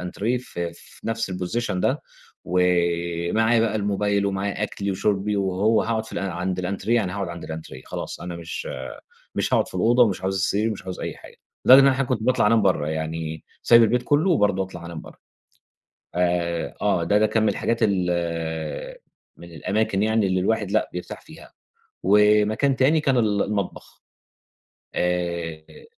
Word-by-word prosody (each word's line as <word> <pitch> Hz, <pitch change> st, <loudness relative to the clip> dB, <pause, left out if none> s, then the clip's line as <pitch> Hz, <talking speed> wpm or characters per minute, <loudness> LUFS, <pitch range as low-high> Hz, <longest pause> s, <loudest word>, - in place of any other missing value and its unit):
الأنتريه 105 Hz, +7 st, -2 dB
ف 125 Hz, -, -12 dB
في 85 Hz, 0 st, -6 dB
نَفْس 115 Hz, -3 st, -2 dB
الposition 95 Hz, +4 st, -2 dB
ده 90 Hz, -, 0 dB, 0.4 s
ومعايا 85 Hz, +4 st, +1 dB
بقى 110 Hz, -1 st, +1 dB
الموبايل 100 Hz, 0 st, 0 dB
ومعايا 100 Hz, 0 st, -2 dB
أكْلي 100 Hz, -1 st, -2 dB
وشُربي 100 Hz, +1 st, 0 dB
وهو 100 Hz, +3 st, +2 dB
هاقعُد 110 Hz, -1 st, -1 dB
في -, -, -12 dB
الأ 95 Hz, -1 st, -3 dB
عند 90 Hz, +2 st, -3 dB
الأنتريه 100 Hz, +5 st, -1 dB
يعني 95 Hz, -6 st, +1 dB
هاقعُد 100 Hz, -2 st, -3 dB
عند 85 Hz, 0 st, -7 dB
الأنتريه، 80 Hz, -5 st, -8 dB
خلاص -, -, -6 dB
أنا 85 Hz, -1 st, -6 dB
مش 85 Hz, -1 st, -6 dB, 0.7 s
مش -, -, 0 dB
هاقعُد -, -, +2 dB
في -, -, -14 dB
الأوضة 120 Hz, +6 st, +4 dB
ومش 100 Hz, -6 st, +1 dB
عاوز 95 Hz, +1 st, -1 dB
السرير، 105 Hz, +4 st, +1 dB
مش 100 Hz, -2 st, -6 dB
عاوز 95 Hz, -1 st, -6 dB
أي -, -, -4 dB
حاجة، -, -, -15 dB, 0.3 s
لدرجة 130 Hz, -, +10 dB
إن -, -, +5 dB
أنا 135 Hz, -, +6 dB
أحيانًا 130 Hz, -1 st, -1 dB
كنت 120 Hz, -4 st, 0 dB
باطلَع 125 Hz, -2 st, +2 dB
أنام 110 Hz, 0 st, +4 dB
برّه، 90 Hz, -6 st, +1 dB
يعني 80 Hz, 0 st, -4 dB, 0.2 s
سايب 115 Hz, 0 st, +7 dB
البيت 120 Hz, +2 st, +2 dB
كلّه 155 Hz, +8 st, +2 dB
وبرضه 100 Hz, -, +2 dB
أطلَع 90 Hz, -2 st, -8 dB
أنام 85 Hz, -2 st, -7 dB
برّه. -, -, -14 dB, 1.0 s
آآ، 85 Hz, -1 st, 0 dB
آه، -, -, +2 dB
ده 105 Hz, -, +3 dB
ده 110 Hz, -, +4 dB
كان 110 Hz, 0 st, +1 dB
من 110 Hz, -, +3 dB
الحاجات 115 Hz, -, 0 dB
ال 85 Hz, -5 st, -1 dB, 0.4 s
من 85 Hz, 0 st, -12 dB
الأماكن 95 Hz, +4 st, -1 dB
يعني 110 Hz, -1 st, +2 dB
اللي 95 Hz, -1 st, +1 dB
الواحد 105 Hz, +1 st, 0 dB
لأ، 110 Hz, -, +1 dB
بيرتاح 90 Hz, -, -6 dB
فيها، 160 Hz, +2 st, -15 dB, 0.5 s
ومكان 105 Hz, +6 st, +4 dB
تاني 145 Hz, +5 st, +3 dB
كان 135 Hz, -3 st, +1 dB
ال 105 Hz, -3 st, +2 dB
المطبخ، 100 Hz, -3 st, -4 dB, 0.9 s
آآ 85 Hz, -, -3 dB
100 Hz, 170 wpm, -23 LUFS, 90-110 Hz, 1.0 s, لدرجة